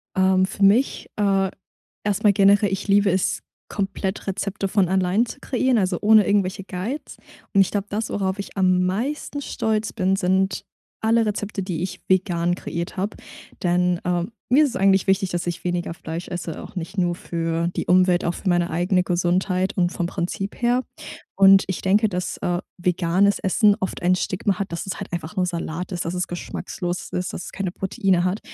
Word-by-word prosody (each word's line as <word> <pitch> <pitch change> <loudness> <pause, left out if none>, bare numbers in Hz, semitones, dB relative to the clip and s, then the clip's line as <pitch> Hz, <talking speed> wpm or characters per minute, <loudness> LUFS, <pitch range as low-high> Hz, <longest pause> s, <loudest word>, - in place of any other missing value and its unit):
Ähm, 190 0 +4
für 195 +1 -3
mich, 220 +8 +3
äh, 195 -2 +2 0.5
erst 205 0 0
mal 205 - +7
generell, 200 0 +4
ich 195 +2 -3
liebe 200 0 +4
es, 185 +1 0 0.3
komplett 195 0 -3
Rezepte 195 0 -2
von 195 -2 +2
allein 190 +4 +2
zu 260 - -9
kreieren, 255 -2 +1
also 185 -3 0
ohne 215 0 +6
irgendwelche 195 -1 0
Guides. 200 +11 -5 0.4
Und 195 - +6
ich 190 - +4
glaub, 205 0 -2
das 215 +2 -3
worauf 190 -1 -1
ich 200 - -9
am 185 -1 +3
meisten 260 +10 -2
stolz 220 -4 -1
bin, 190 +1 +1
sind 190 0 +1 0.4
alle 225 +1 +3
Rezepte, 205 -1 -3
die 175 -3 -3
ich 185 - -4
vegan 175 -2 +2
kreiert 170 -1 -5
habe. 195 +3 -2 0.5
Denn, 180 0 +2
ähm, 175 +4 -1 0.2
mir 295 +4 +6
ist 285 - +1
es 250 - -6
eigentlich 195 -2 +3
wichtig, 195 -1 +2
dass 175 -1 -2
ich 175 -1 -3
weniger 175 -1 -2
Fleisch 165 +1 -6
esse, 175 -3 -5
auch - - -11
nicht 190 +3 -6
nur 175 -1 +2
für 165 -1 -2
die - - -2
Umwelt, 180 0 +4
auch 170 - 0
für 190 - -4
meine 175 -1 +2
eigene 180 +2 +1
Gesundheit 180 +2 0
und 175 0 +2
vom 175 - -2
Prinzip 190 +4 -4
her 245 +1 +2 0.5
und 195 0 +7
ich 190 - -3
denke, 205 +3 +3
dass, 180 -2 -3
äh, 175 0 -1 0.2
veganes 180 +2 +2
Essen 205 +2 +3
oft 190 - -4
ein 180 +1 +3
Stigma 185 +1 -1
hat, 195 -3 -4
dass 170 - -4
es 190 - -4
halt - - -7
einfach 170 +4 -5
nur 185 - +2
Salat 170 +1 -4
ist, 175 - -3
dass 170 - -3
es 180 -1 -1
geschmacklos 175 0 -5
ist, 180 0 -2
dass 175 - -6
es - - -9
keine 190 -2 -3
Proteine 190 -1 0
hat. 185 +3 -1
190 Hz, 195 wpm, -23 LUFS, 180-200 Hz, 0.5 s, mal